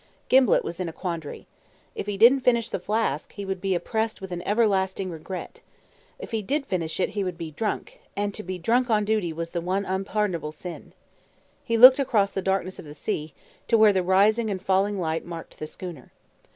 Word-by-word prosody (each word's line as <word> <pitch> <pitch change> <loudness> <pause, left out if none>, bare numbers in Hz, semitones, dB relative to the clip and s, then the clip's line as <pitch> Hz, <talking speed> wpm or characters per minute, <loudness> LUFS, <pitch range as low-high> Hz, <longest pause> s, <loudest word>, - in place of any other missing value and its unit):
Gimblett 255 -4 +5
was 170 - -6
in 180 -2 -2
a - - -9
quandary. 165 -5 -5 0.5
If - - -5
he 205 -1 -2
didn't 240 +6 +7
finish 235 -3 +2
the - - -3
flask, 205 -6 -1
he 200 - -6
would 190 -1 -4
be 190 -1 0
oppressed 220 +5 -2
with 190 -1 -8
an 175 -1 -4
everlasting 195 -3 +1
regret. 170 +3 -7 0.6
If - - -9
he 225 -1 -1
did 275 +7 -1
finish 170 -6 -3
it - - +1
he 205 - -2
would 180 -2 -4
be 165 -2 -6
drunk; 210 +8 -4 0.2
and 205 0 -1
to 215 - -6
be 185 -1 -5
drunk 240 +8 +1
on 210 -2 +2
duty 210 -5 0
was 165 +1 -5
the 170 - -2
one 190 +3 -1
unpardonable 190 -4 -2
sin. 175 +3 -9 0.7
He 230 - 0
looked 255 +4 +10
across 210 -7 +2
the 195 - -3
darkness 190 -1 -1
of - - -9
the 150 0 -10
sea, 150 0 -4 0.3
to 230 - +4
where 215 -2 +6
the 190 - +2
rising 205 +5 +3
and 195 -2 -2
falling 195 +2 +1
light 160 -2 -1
marked 170 -1 -9
the 155 - -5
schooner. 170 -6 -9
190 Hz, 205 wpm, -25 LUFS, 175-215 Hz, 0.7 s, looked